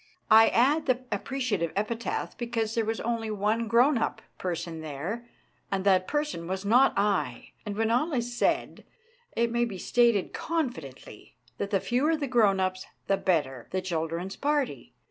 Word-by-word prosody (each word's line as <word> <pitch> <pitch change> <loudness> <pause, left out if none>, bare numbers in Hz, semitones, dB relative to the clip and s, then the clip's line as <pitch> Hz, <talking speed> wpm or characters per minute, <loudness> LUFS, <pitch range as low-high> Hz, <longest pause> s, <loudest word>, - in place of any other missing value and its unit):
I 225 +1 +9
add 290 +6 +3
the 255 -1 +2
appreciative 230 - -1
epithet 225 +3 -2
because 230 -2 -2
there 230 - +1
was 225 +1 -2
only 230 -1 -2
one 215 +2 0
grown 240 +4 +4
up - - -1 0.2
person 170 -2 -4
there, 165 +11 -5 0.4
and 195 -1 0
that 185 -2 +3
person 295 - -2
was 190 +2 -3
not 245 +6 +5
I; 195 -12 0 0.2
and 205 0 -4
when 225 0 +1
all 260 +8 +1
is 245 -3 -2
said - - 0 0.5
it 235 0 +1
may 240 0 +1
be 215 -5 -3
stated 235 0 +2
confidently 240 - -5 0.2
that 200 - -2
the 200 -2 +2
fewer 280 - +1
the 295 - -2
grown 220 -7 +3
ups 185 0 -2 0.2
the 195 - +2
better 145 -11 -1
the 185 - -1
children's 170 +1 -3
party. 290 -2 -1
220 Hz, 165 wpm, -28 LUFS, 185-240 Hz, 0.5 s, I